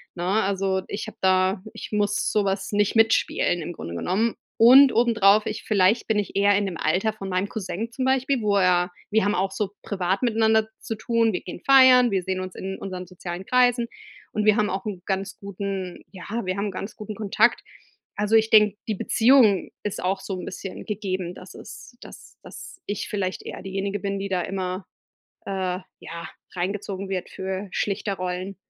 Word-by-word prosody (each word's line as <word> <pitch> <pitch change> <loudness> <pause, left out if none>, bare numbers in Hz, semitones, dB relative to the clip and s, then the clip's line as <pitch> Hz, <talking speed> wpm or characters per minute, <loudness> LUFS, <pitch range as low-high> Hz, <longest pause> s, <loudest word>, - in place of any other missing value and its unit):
ne? 175 - -4
Also, 195 -1 0
ich 205 - -5
habe 220 - -10
da 185 0 +2
ich - - -8
muss 205 -1 0
sowas 200 -2 0
nicht 205 +1 +1
mitspielen 225 -5 +2
im 175 +3 -5
Grunde 85 - -7
genommen 205 - 0 0.2
und 260 +4 +8
obendrauf 215 -3 +4
ich 215 - -4
vielleicht 205 +2 +2
bin 220 -2 +1
ich 205 - -4
eher 200 0 +4
in 205 - 0
dem 185 -4 -4
Alter 190 +9 +1
von 195 -3 -7
meinem 185 +2 -1
Cousin 220 +2 -4
zum 260 +2 -3
Beispiel, 265 -1 +1
wo 205 -1 +2
er 180 -2 +3 0.2
wir 220 -2 +3
haben 205 - +1
auch 190 +2 0
so 205 -3 -3
privat 190 -1 -1
miteinander 220 -1 +3
zu 225 - -5
tun. 230 0 +1
Wir 180 - -2
gehen 180 - -8
feiern, 260 -2 +7
wir 190 -2 0
sehen 190 0 -2
uns 185 -1 -7
in 190 0 -5
unseren 185 -2 -6
sozialen 180 0 -7
Kreisen, 245 -1 +3 0.5
und 210 - 0
wir 215 -1 +5
haben 210 -1 +2
auch 190 +2 -4
'n 195 -4 -5
ganz 195 0 -3
guten 195 -2 -5
ja, 185 -2 -10 0.2
wir 185 +1 -2
haben 205 +1 -1
'n - - -4
ganz 195 +3 -6
guten 215 0 -7
Kontakt. 215 +3 +2 0.5
Also 210 +2 +1
ich 220 0 +4
denke, 210 -1 +6
die 215 - -1
Beziehung 225 -2 +4
ist 205 -3 -4
auch 190 +1 0
so 195 -2 -5
'n - - -6
bisschen 190 0 -7
gegeben, 190 -4 -3
dass 185 - -12
es 245 - -12
dass - - -13
dass - - -11
ich 205 -1 -4
vielleicht 190 -3 -2
eher - - -7
diejenige 195 +1 -3
bin, 200 0 -3
die 200 0 -4
da 180 -2 0
immer, 185 0 -4 0.6
äh, 185 -2 -2 0.2
ja, 170 +1 -8 0.3
reingezogen 195 +1 -3
wird 185 -2 -3
für 190 +1 -5
Schlichterrollen. 190 -2 -3
200 Hz, 190 wpm, -24 LUFS, 185-215 Hz, 0.6 s, und